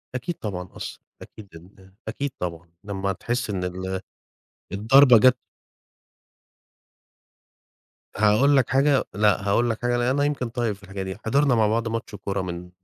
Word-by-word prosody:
أكيد 165 Hz, +7 st, -3 dB
طبعًا 90 Hz, -4 st, -6 dB
أثّ -, -, -7 dB, 0.2 s
أكيد 105 Hz, -3 st, -13 dB
إن 95 Hz, +3 st, -17 dB
أكيد 140 Hz, 0 st, -3 dB
طبعًا 85 Hz, -1 st, -5 dB
لما 100 Hz, -1 st, -3 dB
تحس 120 Hz, +4 st, -3 dB
إن 95 Hz, -3 st, -2 dB
ال 95 Hz, +1 st, -4 dB, 0.7 s
الضربة 125 Hz, +5 st, +6 dB
جات 130 Hz, +3 st, +5 dB, 2.8 s
هاقول 110 Hz, +7 st, +4 dB
لك 130 Hz, -, +2 dB
حاجة، 135 Hz, 0 st, +3 dB
لأ 105 Hz, -1 st, +2 dB
هاقول 120 Hz, +4 st, +2 dB
لك 115 Hz, -, -3 dB
حاجة 120 Hz, 0 st, 0 dB
لأن 120 Hz, 0 st, 0 dB
أنا 140 Hz, +3 st, +1 dB
يمكن 140 Hz, -5 st, -1 dB
طيب 115 Hz, -3 st, -2 dB
في 100 Hz, -, -22 dB
الحاجة 95 Hz, 0 st, -6 dB
دي، 95 Hz, 0 st, -6 dB
حضرنا 135 Hz, +2 st, +3 dB
مع 110 Hz, -2 st, +3 dB
بعض 115 Hz, +2 st, 0 dB
ماتش 115 Hz, -2 st, -4 dB
كورة 100 Hz, -1 st, -3 dB
من 90 Hz, 0 st, -6 dB
110 Hz, 155 wpm, -24 LUFS, 95-125 Hz, 2.8 s, الضربة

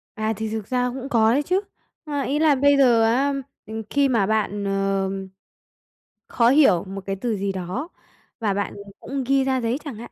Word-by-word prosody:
À, 220 Hz, -1 st, -1 dB
thì 220 Hz, 0 st, -3 dB
thực 220 Hz, -2 st, -4 dB
ra 250 Hz, -1 st, 0 dB
cũng 265 Hz, +2 st, -6 dB
có 225 Hz, -3 st, +4 dB
đấy 280 Hz, +5 st, +2 dB
chứ. 370 Hz, +6 st, +1 dB, 0.4 s
A, 290 Hz, -2 st, -2 dB
ý 280 Hz, +2 st, -1 dB
là 310 Hz, -2 st, +4 dB
bây 285 Hz, +1 st, +4 dB
giờ 240 Hz, -4 st, +5 dB
á, 265 Hz, +5 st, +2 dB, 0.3 s
ừm, 220 Hz, 0 st, -6 dB
khi 280 Hz, -1 st, +2 dB
mà 225 Hz, -6 st, +2 dB
bạn, 205 Hz, -1 st, -1 dB
ờm, 195 Hz, -1 st, -1 dB, 1.0 s
khó 235 Hz, 0 st, +3 dB
hiểu 270 Hz, -, +5 dB
một 195 Hz, +1 st, -6 dB
cái 195 Hz, -, -2 dB
từ 235 Hz, -3 st, -1 dB
gì 195 Hz, 0 st, -1 dB
đó 190 Hz, -, -4 dB, 0.5 s
và 215 Hz, -4 st, 0 dB
bạn, 200 Hz, +1 st, -2 dB
ừm, 200 Hz, 0 st, -11 dB
cũng 275 Hz, -1 st, -4 dB
ghi 270 Hz, +1 st, +2 dB
ra 265 Hz, -1 st, 0 dB
giấy 230 Hz, +2 st, 0 dB
chẳng 275 Hz, -6 st, -6 dB
hạn. 235 Hz, +2 st, -10 dB
230 Hz, 210 wpm, -23 LUFS, 200-270 Hz, 1.0 s, giờ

